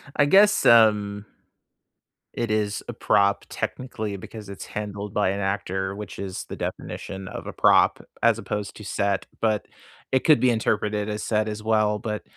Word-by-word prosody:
I 145 - +4
guess, 205 +7 +5
um 105 -3 +5 1.1
it 120 -2 -2
is 105 -1 -1
a - - -5
prop 100 -1 +2
technically 110 -5 -4
because 105 +2 -10
it's 100 - -8
handled 105 -1 -5
by 105 -2 +2
an 100 +1 -2
actor, 95 -1 -2
which 105 -2 -8
is 95 -2 -5
the - - -5
definition 95 -1 -6
of - - -7
a - - -5
prop - - +4 0.2
as - - +4
opposed 105 -1 -4
to 105 - -10
set, 100 -1 -1 0.2
but 110 -2 +1 0.5
it 130 - +2
could 155 -2 +5
be 130 - +4
interpreted 105 -2 0
as 105 0 -3
set 110 -1 0
as 105 0 -5
well. 110 -1 +2
But, 105 -1 -4
105 Hz, 170 wpm, -24 LUFS, 100-110 Hz, 1.1 s, guess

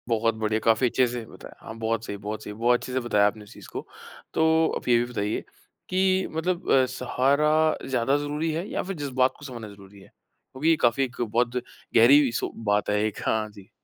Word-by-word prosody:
बहुत 115 0 +1
बढ़िया, 110 0 -1
काफ़ी 115 +2 +3
अच्छे 130 +1 +2
से 120 -1 -5
बताया। - - -13
हाँ, 110 - -7
बहुत 115 0 -1
सही 100 - -5
बहुत 105 +1 -6
सही। 105 - -7
बहुत 120 +3 +2
अच्छे 130 - -7
से 130 - +1
बताया 105 -4 +3
आपने 105 +1 -4
इस 105 - -15
चीज़ - - -13
को। - - -6 0.5
तो 160 - +2 0.3
आप - - -10
ये 120 -1 +5
भी 120 - +1
बताइए 105 -2 -2 0.5
कि 190 0 +2
मतलब 175 +3 -2
अ, 130 -1 +5
सहारा 140 +5 +2
ज़्यादा 135 +1 +1
ज़रूरी 150 +2 -2
है 165 +5 -3
या - - -2
फिर 195 +1 -5
जज़्बात 130 -4 0
को 145 - -11
समझना 120 -5 -7
ज़रूरी 100 0 -15
है? - - -16
क्योंकि 140 +5 -6
ये 165 - +6
काफ़ी 120 +3 +3
एक 125 -2 -5
बहुत 120 +2 0 0.4
गहरी 130 +3 +6
सो 120 - -2
बात 105 0 +1
है 105 0 +2
एक। 110 -2 -2
हाँ 110 -1 0
जी। 100 -2 -15
120 Hz, 215 wpm, -25 LUFS, 110-145 Hz, 0.5 s, ये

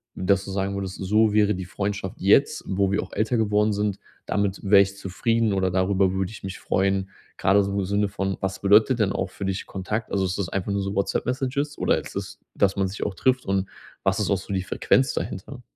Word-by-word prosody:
dass 95 +1 +1
du 95 - -6
sagen 95 0 -1
würdest: 95 -1 -4
So 105 +3 +2
wäre 105 0 +4
die 95 - -5
Freundschaft 100 +1 -4
jetzt, 135 +10 +3
wo 95 0 +1
wir 100 - +1
auch - - -12
älter 110 +3 0
geworden 105 -1 +2
sind 105 -1 -1 0.3
damit 100 -1 -1
wäre 100 0 +6
ich 100 0 -1
zufrieden 115 +4 0
oder 95 -1 +1
darüber 95 +1 +2
würde 95 +1 -2
ich 105 - -11
mich 95 -1 -5
freuen? 95 0 0 0.3
Grade 100 +2 +4
so 100 - -3
im - - 0
Sinne 100 +2 +1
von, 95 -1 -2
was 95 0 -3
bedeutet 110 +5 +5
denn 100 -2 +2
auch 95 - -2
für 100 - -8
dich 95 0 -2
Kontakt? 105 +4 -4
Also, 95 -1 +1
ist 95 +1 -2
das 100 - -1
einfach 100 +1 -2
nur 100 - 0
so 95 +1 -3
WhatsApp-Messages 130 +8 -1
oder - - +2
ist - - -10
das, - - -5 0.2
dass 95 -1 +2
man 95 -1 +1
sich 95 - -5
auch 100 - -3
trifft 130 +6 +1
und 95 0 0 0.3
was - - +1
ist - - 0
auch 100 - +3
so 100 +1 -6
die 95 -1 0
Frequenz 130 +7 +2
dahinter? 125 +7 -5
100 Hz, 230 wpm, -24 LUFS, 95-105 Hz, 0.3 s, wäre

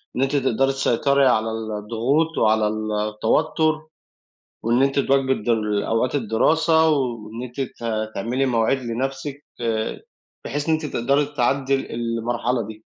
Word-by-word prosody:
إن 125 - -1
أنتِ 135 +2 +1
تقدَري 135 -1 +2
تسيطَري 135 +1 +2
على 115 -2 +2
الضغوط 115 +8 -1
وعلى 110 -1 +3 0.4
التوتُّر، 155 +8 +1 0.8
وإن 120 +3 +3
أنتِ 135 0 +2
تواكبي 135 -1 +2
الد 115 -2 -5
ال 105 -3 +1
أوقات 115 +4 0
الدراسة، 160 +7 +3
وإن 120 -5 -2
أنتِ 125 +2 -5
ت 125 - -6 0.3
تعملي 125 +7 0
مواعيد 120 +1 +2
لنفسِك، 135 +4 -4 0.2
ت - - -5 0.8
بحيث 145 +1 -3
إن - - +4
أنتِ 155 0 -1
تقدَري 140 +2 +1
تعدِّي 135 -1 +1
ال 135 - -5
المرحلة 115 0 -1
دي؟ 110 0 -10
130 Hz, 140 wpm, -22 LUFS, 115-140 Hz, 0.8 s, إن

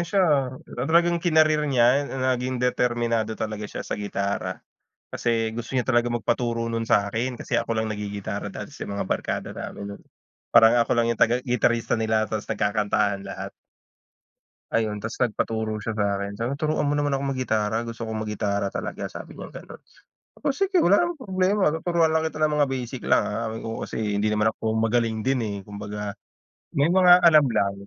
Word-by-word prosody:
siya, 165 -6 +2 0.4
talagang 170 +1 +3
kinareer 155 -3 +3
niya, 130 +2 +3
naging 130 -1 -1
determinado 120 -3 0
talaga 105 -1 -4
siya - - -6
sa - - -4
gitara. 100 0 -3 0.4
Kasi 115 -1 -1
gusto 120 +2 -6
niya 130 -1 0
talaga 120 -1 +2
magpaturo 115 0 -1
nun 115 0 -2
sa'kin 110 +4 +1
kasi - - -1
ako - - 0
lang 110 - -2
naggigitara 105 -1 -4
dati - - -7
sa - - -5
mga 100 0 -4
barkada - - -3
namin 100 0 -6
nun. - - -20 0.5
Parang 115 0 +7
ako - - -12
lang 115 - +1
yung 115 - 0
taga 120 +2 +4
gitarista 120 -2 +1
nila 110 -1 +1
tapos 110 -1 -3
nagkakantahan 100 -1 0
lahat. 100 0 -7 1.2
Ayun, 105 -2 -1
tapos 110 +2 -5
nagpaturo 110 -1 -2
siya 110 +1 -3
sa'kin. 100 -1 -1
Sabi, 120 +4 -1
"Turuan 155 -2 0
mo 145 - +1
naman 145 0 +1
akong 135 0 -2
maggitara, 110 -3 0
gusto 115 -1 -6
kong 110 -1 -3
maggitara 100 -2 -1
talaga," - - -4
sabi - - -9
niyang - - -9
gano'n. - - -11 0.6
"O 285 - +1
sige, 385 +4 +1
wala 200 - +5
namang 345 -2 -2
problema. 190 -4 +1
Tuturuan 165 0 +2
lang 160 0 +2
kita 160 -1 -3
ng 155 -1 +2
mga 145 - +5
basic 130 -1 -4
lang - - +4
ah," 115 +2 -2
sabi 110 +1 -5
ko. 115 0 -4
Kasi - - -7 0.2
hindi 105 +1 +1
naman 105 +1 +2
ako 110 0 -2
magaling 115 0 +1
din 135 -1 +2
eh, 105 -2 -3
kumbaga, 105 0 -6 0.6
may 140 +3 +3
mga 180 -1 +7
alam 155 -4 +7
lang, 100 -4 +1
115 Hz, 175 wpm, -25 LUFS, 105-140 Hz, 1.2 s, Parang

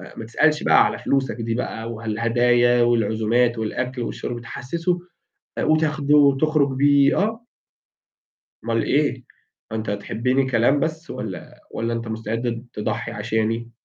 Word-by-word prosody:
م - - -10
ما 110 - -6
تسألش 150 +7 +2
بقى - - +5
على - - -2
فلوسك 135 -5 0
دي 115 -1 -3
بقى 115 -2 -4
والهدايا 120 +2 +2
والعزومات 115 +1 +2
والأكل 125 +3 -3
والشرب 120 0 -4
تحسسه 170 +9 -3 0.6
وتاخده 155 -2 +2
وتخرج 140 0 +3
بيه، 140 0 +4
آه. 220 +3 -1 1.2
أومال 115 -1 0
إيه؟ 140 -4 0 0.5
هو - - -3
أنت 110 0 -3
هتحبني 125 +6 -1
كلام 120 +4 +3
بس 160 +2 -3
والّا - - -7
والّا 115 +1 -2
أنت 115 0 -4
مستعد 115 +2 -3
ت - - -7
تضحي 110 +2 -3
عشاني؟ 115 +1 -2
120 Hz, 135 wpm, -22 LUFS, 115-140 Hz, 1.2 s, بقى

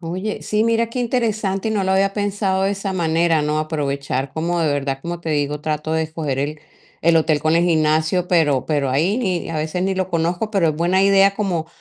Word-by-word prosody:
Oye, 185 +5 -4
sí, 210 0 0
mira 230 0 +1
qué 250 - -3
interesante, 220 -5 -1
y - - -1
no 205 -3 0
lo 190 - 0
había 195 +1 +2
pensado 200 -2 -1
de 195 - +2
esa 195 -1 -3
manera, 165 -2 +1
¿no? 150 +1 0
Aprovechar, 140 -3 -2
como 170 +2 -1
de 155 -3 +1
verdad. 135 -1 -2
Como 170 0 -5
te 165 -2 -4
digo, 150 0 -1
trato 155 +1 -3
de 160 0 +1
escoger 155 -4 -4
el 150 +2 -3 0.4
el 165 0 +4
hotel 155 -1 +2
con 155 +2 +2
el 170 - +3
gimnasio, 160 +1 +1
pero 150 -7 +2
pero 145 -4 0
ahí 165 - +1
ni 185 -8 -2
a 165 - -3
veces, 155 +4 -2
ni 190 0 0
lo 185 -1 -1
conozco. 175 +4 -1
Pero, 195 -6 +2
es 155 - -1
buena 175 +4 +2
idea, 195 0 +4
como 180 -6 -2
170 Hz, 225 wpm, -20 LUFS, 155-195 Hz, 0.4 s, el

